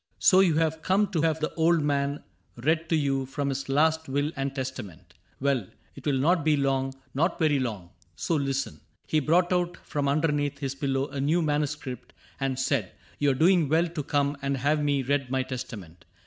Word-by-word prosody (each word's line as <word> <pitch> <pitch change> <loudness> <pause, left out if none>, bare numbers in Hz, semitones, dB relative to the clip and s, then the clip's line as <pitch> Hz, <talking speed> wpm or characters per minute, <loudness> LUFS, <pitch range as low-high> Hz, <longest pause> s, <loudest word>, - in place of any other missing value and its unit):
'^ - - -55
So 185 - +5
you 180 -5 +4
have 160 0 +1
come 195 +5 +2
to 165 - 0
have 160 0 +1
the 155 - -1
old 165 -1 +3
man 140 0 0 0.4
read 160 +2 +1
To 165 - +3
vou 135 -3 0
from 140 +1 -2
his 135 0 -4
last 160 +2 +2
will 145 +3 0
and 135 0 -3
testament: 100 - -6 0.3
Well, 135 -7 0 0.3
it - - -8
will 140 -2 +2
not 165 +5 +2
be 155 -1 +3
long 135 -1 0
— - - -36
not 165 +7 +1
very 155 -4 +2
long 105 -9 -4
— 85 -2 -39
So - - +1
listen." 135 -2 -2 0.3
He 155 - +1
brought 175 +5 +2
out 175 0 0
from 145 -1 -1
underneath 145 -1 +1
His 135 -2 -3
pillow 135 0 -1
a 140 - -4
new 160 +5 +2
manuscript, 145 -4 -2 0.3
and 135 -2 -1
said, 135 -4 +1
^^ - - -20 0.3
You 145 - +3
are 135 - +2
doing 165 +1 +4
well 165 +3 +3
to 165 -2 -4
come 145 -1 0
and 140 0 -1
have 150 +3 +1
me 145 -2 +1
read 135 0 0
My 130 0 0
testament. 100 -10 -8
145 Hz, 210 wpm, -27 LUFS, 135-160 Hz, 0.4 s, So